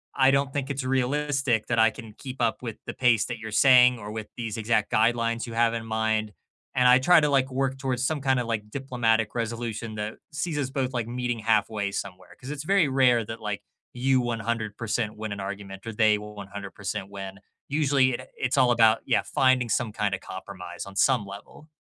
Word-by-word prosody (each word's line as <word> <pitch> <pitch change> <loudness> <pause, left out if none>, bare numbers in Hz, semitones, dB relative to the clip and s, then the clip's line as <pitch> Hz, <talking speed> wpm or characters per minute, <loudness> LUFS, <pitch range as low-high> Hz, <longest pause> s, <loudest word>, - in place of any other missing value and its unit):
I 135 -1 +5
don't 135 0 +1
think 140 -1 -2
it's 135 -1 -3
realistic 135 -2 0
that 115 - 0
I 110 0 +6
can 110 -1 -11
keep 130 +3 -8
up 115 0 0
with 115 -3 -6
the - - -5
pace 120 -4 +3
that 120 - -5
you're 110 0 -7
saying 125 +1 +6
or 105 0 -7
with 110 -1 -5
these 115 -2 -4
exact 110 -1 0
guidelines 115 +1 +2
you 115 - -8
have 115 0 +2
in 115 -1 -4
mind." 110 -1 0 0.4
And 125 -1 +4
I 125 +1 +7
try 175 +5 +6
to, 150 - +2
like, 135 -1 +2
work 135 0 -1
towards 130 -2 -1
some 155 -3 -2
kinda 130 -3 +1
like 110 -2 -3
diplomatic 115 -5 0
resolution 115 -1 -3
that 105 +1 -5
sees 155 0 -3
us 135 -2 -1
both, 135 -2 -2
like, 120 -3 -1
meeting 120 -1 -2
halfway 105 -2 +1
somewhere, 95 -2 -6
'cause 130 - -9
it's 150 -1 -5
very 185 -2 +3
rare 125 -4 +3
that, 115 +2 -7
like, 105 -2 -3 0.3
you 130 +1 +2
100% 115 -2 -2
win 110 -1 -4
an 100 - -6
argument 95 0 -7
or 115 - -4
they 105 0 +4
will 105 0 -9
100% 100 -1 -6
win. 95 -1 -7 0.3
Usually, 135 -4 +2
eh, - - -9
it's 130 +2 -1
all 125 -2 +5
about 115 -1 +4
yeah, - - +2
finding 130 -2 +2
some 115 +1 0
kinda 105 -2 -1
compromise 95 -2 -8
on 100 0 -11
some 130 -5 +3
level. 100 +10 -11
115 Hz, 205 wpm, -26 LUFS, 105-130 Hz, 0.4 s, I